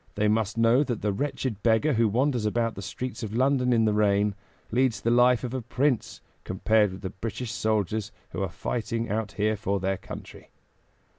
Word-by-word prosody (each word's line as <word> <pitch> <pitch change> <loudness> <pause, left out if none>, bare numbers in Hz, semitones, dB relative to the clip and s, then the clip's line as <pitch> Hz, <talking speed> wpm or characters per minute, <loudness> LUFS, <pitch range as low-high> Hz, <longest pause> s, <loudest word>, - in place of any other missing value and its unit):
They 105 +1 +2
must 110 0 +1
know 115 +4 +4
that 120 -8 -4
the 105 -1 +1
wretched 130 -3 -3
beggar 115 +6 +3
who 115 -1 +3
wanders 125 +2 +1
about 115 +1 0
the - - -7
streets 105 +8 -5
of 110 -1 -4
London 130 0 +2
in 115 -2 +4
the 105 - +2
rain, 105 -1 +2 0.4
leads 125 0 +2
the 115 - 0
life 125 +1 +4
of 125 0 -4
a 130 - -2
prince 130 +2 -1 0.2
compared 105 +2 +2
with 95 - -9
the 95 -2 -4
British 115 +3 -5
soldiers 110 -1 -1 0.2
who - - -4
are 95 - -1
fighting 115 +4 -3
out 110 -1 -2
here 105 +1 +1
for 100 0 -1
their 95 +1 -1
country. - - -10
110 Hz, 195 wpm, -27 LUFS, 105-125 Hz, 0.4 s, know